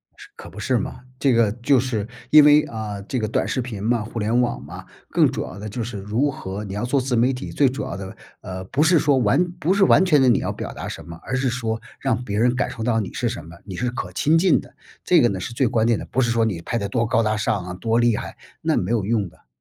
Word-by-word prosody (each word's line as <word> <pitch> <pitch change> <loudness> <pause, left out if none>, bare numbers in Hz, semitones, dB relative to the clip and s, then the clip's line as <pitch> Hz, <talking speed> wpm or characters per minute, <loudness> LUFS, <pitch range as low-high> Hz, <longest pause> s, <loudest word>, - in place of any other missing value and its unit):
是 - - -14
可 - - -11
不 - - -11
是 125 +3 +1
吗？ 110 - -5 0.2
这 135 -3 +3
个 115 -3 +3
就 125 +4 +2
是 115 -4 -2 0.2
因 150 -1 +9
为， 150 +1 +6
啊， 105 -3 -5
这 125 +6 -3
个 110 - -1
短 - - 0
视 130 - -1
频 110 -5 -6
嘛、 115 -1 +1
互 115 - -8
联 110 +3 +1
网 120 - -1
嘛， - - -10 0.2
更 - - +3
主 - - -3
要 95 - -9
的 105 - -6
就 115 +3 -4
是 110 -2 -6
如 115 +9 0
何 100 -4 -6
你 100 -2 -6
要 105 - -3
做 135 +3 +1
自 125 -1 -1
媒 125 +3 +3
体， 125 +2 -6
最 140 - +3
主 130 +1 -3
要 - - -5
的， 95 0 -8 0.3
呃， 95 0 -6
不 140 +9 -1
是 170 +2 +5
说 145 -2 +3
完 120 +7 +3 0.2
不 170 +5 +2
是 200 0 +3
完 190 - +6
全 150 -7 +4
地 130 - +5
你 120 - +4
要 - - -2
表 - - -6
达 - - -6
什 - - -7
么， 85 0 -9
而 130 - -3
是 130 0 +1
说 115 -2 -2 0.2
让 125 -2 -1
别 105 -3 -2
人 120 +2 +3
感 130 - 0
受 115 - -6
到 115 -1 +1
你 100 - -4
是 120 - -1
什 85 -7 -6
么， 85 +1 -12
你 95 - -7
是 125 +6 -1
可 125 - -5
亲 155 +3 +3
近 185 +1 +4
的。 - - -17 0.3
这 175 -2 +4
个 120 - +4
呢 95 - -3
是 105 - -5
最 130 +2 +2
关 110 0 +1
键 115 -2 +2
的， - - -7
不 130 - -3
是 115 -1 +1
说 115 -1 +2
你 95 -7 -2
拍 115 - -2
得 100 - -2
多 115 +2 0
高 115 +1 +2
大 110 -1 +1
上 100 -3 -1
啊， 90 - -6
多 115 +5 0
厉 120 -2 +3
害， - - -7 0.2
那 - - +1
没 90 - -1
有 110 -5 +1
用 105 -3 0
的。 - - -26
115 Hz, 310 characters per minute, -22 LUFS, 105-130 Hz, 0.3 s, 因